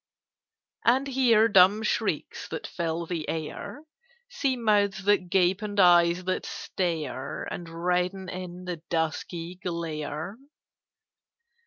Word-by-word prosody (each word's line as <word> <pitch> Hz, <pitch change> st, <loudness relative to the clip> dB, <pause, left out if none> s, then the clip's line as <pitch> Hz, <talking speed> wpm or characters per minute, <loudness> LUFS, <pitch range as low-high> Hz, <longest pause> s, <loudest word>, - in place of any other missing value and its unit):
"And 260 Hz, +4 st, +3 dB
hear 245 Hz, -5 st, +4 dB
dumb 200 Hz, +1 st, +5 dB
shrieks -, -, -1 dB
that -, -, -5 dB
fill 170 Hz, 0 st, -3 dB
the 165 Hz, -2 st, -4 dB
air; 160 Hz, -, -5 dB, 0.5 s
See 265 Hz, -, 0 dB
mouths 205 Hz, -4 st, +2 dB
that 200 Hz, -3 st, +2 dB
gape, 185 Hz, +2 st, +3 dB
and 205 Hz, -1 st, -3 dB
eyes 175 Hz, -1 st, +5 dB
that 185 Hz, 0 st, -1 dB
stare 160 Hz, -7 st, -3 dB
And 170 Hz, -1 st, -6 dB
redden 180 Hz, +3 st, -1 dB
in 180 Hz, 0 st, -7 dB
the 180 Hz, -1 st, -3 dB
dusky 165 Hz, +2 st, -2 dB
glare? 165 Hz, +2 st, -4 dB
180 Hz, 115 wpm, -27 LUFS, 170-205 Hz, 0.5 s, dumb